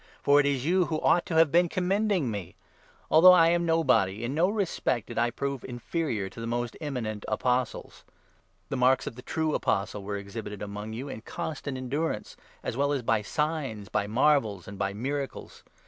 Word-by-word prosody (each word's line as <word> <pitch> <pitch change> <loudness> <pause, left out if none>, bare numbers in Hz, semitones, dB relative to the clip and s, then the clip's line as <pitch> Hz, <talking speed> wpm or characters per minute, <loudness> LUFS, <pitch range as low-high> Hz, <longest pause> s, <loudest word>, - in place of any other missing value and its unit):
For 145 +1 +5
it 145 - +3
is 135 -2 0
you 180 +2 +3
who 155 0 -2
ought 175 - +3
to 165 - -2
have 160 -2 +5
been 175 +1 +4
commending 185 - +1
me! 95 -4 -6 0.6
Although 180 +4 +9
I 165 -2 +6
am 170 0 +1
nobody, 120 - +2
in 120 +3 -2
no 170 +5 +3
respect 190 - -1
did - - -4
I 120 0 +2
prove 140 +2 -4
inferior 120 - -3
to 100 +4 -10
the 115 - -4
most 120 0 -2
eminent 115 -8 -4
Apostles. 125 -1 -1 0.7
The 135 - -2
marks 130 +1 +3
12 - - -3
of - - -20
the 125 - -9
true 155 +3 -1
Apostle 100 0 -1
were 100 +1 -4
exhibited 105 +1 -7
among 105 +2 -6
you 125 +5 -5
in 110 - -7
constant 140 +2 -5
endurance, 140 +6 -3 0.3
as - - -3
well 140 +2 +1
as 135 -3 -2
by 115 -2 +2
signs, 140 -5 -2
by 100 - 0
marvels, 110 - +2
and 100 0 -9
by 100 - 0
miracles. 135 +6 -5
130 Hz, 195 wpm, -28 LUFS, 110-160 Hz, 0.7 s, Although